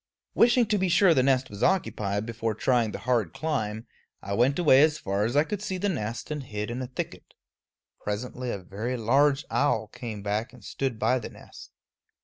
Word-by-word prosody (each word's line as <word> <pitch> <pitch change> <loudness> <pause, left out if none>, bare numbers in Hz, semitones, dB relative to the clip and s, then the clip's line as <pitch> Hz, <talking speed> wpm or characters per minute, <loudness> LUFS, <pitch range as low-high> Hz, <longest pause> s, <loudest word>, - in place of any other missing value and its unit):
Wishing 240 +1 +5
to 210 -1 0
be 185 0 +1
sure 175 0 +5
the 130 - +3
nest 130 -1 +1
was 100 - -8
occupied 105 - 0
before 115 -1 -3
trying 120 0 +2
the - - -5
hard 115 -9 +1
climb, 110 -9 -2 0.4
I 100 - -4
went 125 +6 +2
away 150 -6 +6
as 155 0 +4
far 100 -4 -1
as 120 +4 -2
I 145 - +5
could 205 +3 -4
see 190 -3 -3
the 200 +3 0
nest 115 - -4
and 150 -1 -3
hid 105 -4 -5
in 125 +2 -4
a 130 - -4
thicket. 125 - -7 0.7
Presently 125 +4 -4
a 100 - -2
very 105 +7 -4
large 135 +5 +3
owl 125 -7 +1
came 110 -4 -7
back 105 +5 -2
and 125 -4 -15
stood 130 -4 -3
by 125 +2 +2
the 115 - -7
nest. - - -13
125 Hz, 200 wpm, -27 LUFS, 110-150 Hz, 0.7 s, away